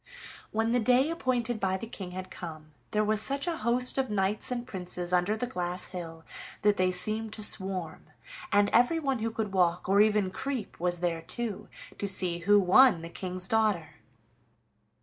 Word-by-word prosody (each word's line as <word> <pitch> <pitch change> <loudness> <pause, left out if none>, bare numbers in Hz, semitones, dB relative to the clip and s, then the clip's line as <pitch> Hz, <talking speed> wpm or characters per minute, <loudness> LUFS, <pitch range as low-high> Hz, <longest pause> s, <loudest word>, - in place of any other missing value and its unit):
When 225 +1 0
the 245 - +3
day 255 +6 +3
appointed 245 -7 -1
by 190 -1 0
the 210 - -7
King 195 -5 -8
had 185 +1 -7
come, 155 -3 -9 0.2
there 215 0 +1
was 215 0 +4
such 275 +5 0
a 340 -2 -2
host 250 +3 +2
of 265 - -1
knights 205 0 0
and 245 -1 -3
princes 180 -3 -3
under 180 +4 +2
the 245 - -2
glass 180 -6 -3
hill 165 -3 -8 0.4
that 210 0 +4
they 185 0 +2
seemed 215 +4 -1
to 215 - -4
swarm, 190 -5 -2 0.5
and 205 -1 +4
everyone 270 +1 +2
who 225 +1 -1
could 220 -3 -4
walk 175 -2 +1
or 200 +2 +4
even 210 -3 +2
creep 260 +1 -5
was 175 0 0
there 170 -2 -1
too, 220 +4 -3 0.3
to 200 - -2
see 180 -3 +2
who 205 +4 +4
won 195 -1 +5
the 165 - -7
King's 180 +1 -4
daughter. 210 -8 0
205 Hz, 180 wpm, -28 LUFS, 180-230 Hz, 0.5 s, won